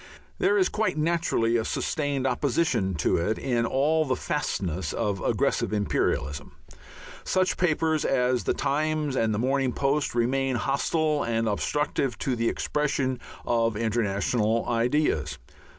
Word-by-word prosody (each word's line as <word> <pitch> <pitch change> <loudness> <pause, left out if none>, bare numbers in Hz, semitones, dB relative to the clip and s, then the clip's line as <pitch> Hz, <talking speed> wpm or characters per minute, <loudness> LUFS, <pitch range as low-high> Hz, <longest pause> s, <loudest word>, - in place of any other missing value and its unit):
There 400 +2 +3
is 380 - +4
quite 215 -6 -1
naturally 155 -8 +1
a 115 - 0
sustained 145 +1 -1
opposition 130 - +1
to 75 - +1
it 100 +6 0
in 120 -3 0
all 150 +5 +2
the 130 -4 0
fastnesses 90 - -2
of 100 -2 -1
aggressive - - 0
imperialism. 75 -8 -1 0.7
Such 185 -1 +1
papers 160 -2 +1
as 125 -2 +1
the - - +1
Times 155 -1 0
and 115 -3 +1
the 105 - -1
Morning 130 +2 +1
Post 140 -1 0
remain 130 +2 +1
hostile 145 +5 0
and 115 -2 0
obstructive 135 +2 -1
to 130 0 -1
the 115 0 +1
expression 140 -3 -1 0.3
of 115 -2 +1
international 110 0 0
ideas. 125 +6 +1
130 Hz, 135 wpm, -26 LUFS, 115-150 Hz, 0.7 s, is